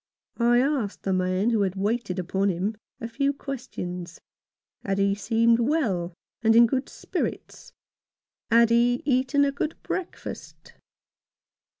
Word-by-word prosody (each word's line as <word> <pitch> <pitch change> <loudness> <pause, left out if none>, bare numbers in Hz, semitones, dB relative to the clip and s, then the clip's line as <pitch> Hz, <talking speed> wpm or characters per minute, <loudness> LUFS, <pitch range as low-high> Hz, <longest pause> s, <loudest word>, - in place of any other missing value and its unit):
I 240 +1 +4
asked 260 -6 -1
the 190 - 0
man 185 +4 +1
who 225 -3 +2
had 190 -1 0
waited 205 -1 -1
upon 190 +2 0
him 190 +4 -1 0.2
a 230 - -4
few 275 +4 0
questions. 180 - -6 0.6
Had 195 -1 -1
he 200 0 +2
seemed 230 +3 +2
well 225 - 0 0.3
and 225 0 +4
in 235 +1 +8
good 260 +3 -1
spirits? - - -5 0.8
had 235 0 +5
he 240 +1 +3
eaten 265 +1 +2
a 280 - +1
good 290 +3 -3
breakfast 370 -2 -6
230 Hz, 130 wpm, -25 LUFS, 195-255 Hz, 0.8 s, in